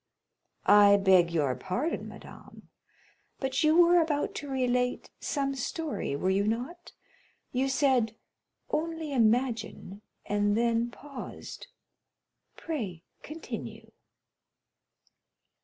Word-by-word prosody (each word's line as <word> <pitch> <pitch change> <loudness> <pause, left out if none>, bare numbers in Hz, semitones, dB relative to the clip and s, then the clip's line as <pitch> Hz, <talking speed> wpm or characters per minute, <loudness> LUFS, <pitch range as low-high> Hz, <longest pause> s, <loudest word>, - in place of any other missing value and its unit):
"I 205 -1 +7
beg 190 -3 +5
your 145 -6 +1
pardon, 190 - -3
madame, - - -13 0.7
but 265 +4 -1
you 310 +1 +4
were 350 0 +6
about 300 -3 -1
to 290 - -6
relate 250 -1 0
some 275 -2 -1
story, 280 - -3
were 185 +6 0
you 200 +2 +1
not? 255 +11 -4 0.6
You 260 +2 0
said, 260 -5 +2 0.6
'only 320 -2 -2
imagine,'—and 215 -3 0
then 235 0 +1
paused. 275 - -9 0.9
Pray 210 - -5 0.2
continue." 315 +2 -8
250 Hz, 90 wpm, -29 LUFS, 205-290 Hz, 0.9 s, I